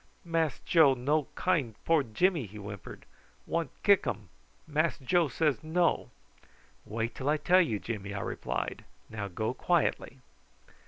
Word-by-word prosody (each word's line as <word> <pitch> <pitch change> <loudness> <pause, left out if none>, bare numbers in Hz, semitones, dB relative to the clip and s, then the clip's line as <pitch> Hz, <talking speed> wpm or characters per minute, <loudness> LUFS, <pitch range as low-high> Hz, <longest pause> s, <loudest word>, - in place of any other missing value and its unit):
"Mass 165 -4 0
Joe 155 -6 +5
no 145 +4 0
kind 150 -12 0
poor 165 -2 +4
Jimmy," 140 - +1
he 105 +2 -11
whimpered. 100 -2 -9 0.4
"Want 165 0 -1
kick 200 -2 +5
um. 105 -3 -4 0.4
Mass 155 +2 0
Joe 165 +5 +2
say 150 +2 +1
no." 170 +2 +1 0.8
"Wait 115 +2 -3
till 135 +2 -3
I 150 - +3
tell 180 +4 +4
you, 130 - 0
Jimmy," 100 -3 -5
I 100 -1 -3
replied. - - -3 0.3
"Now 105 -2 -4
go 110 +5 -2
quietly." 165 -3 0
145 Hz, 145 wpm, -30 LUFS, 110-165 Hz, 0.8 s, Joe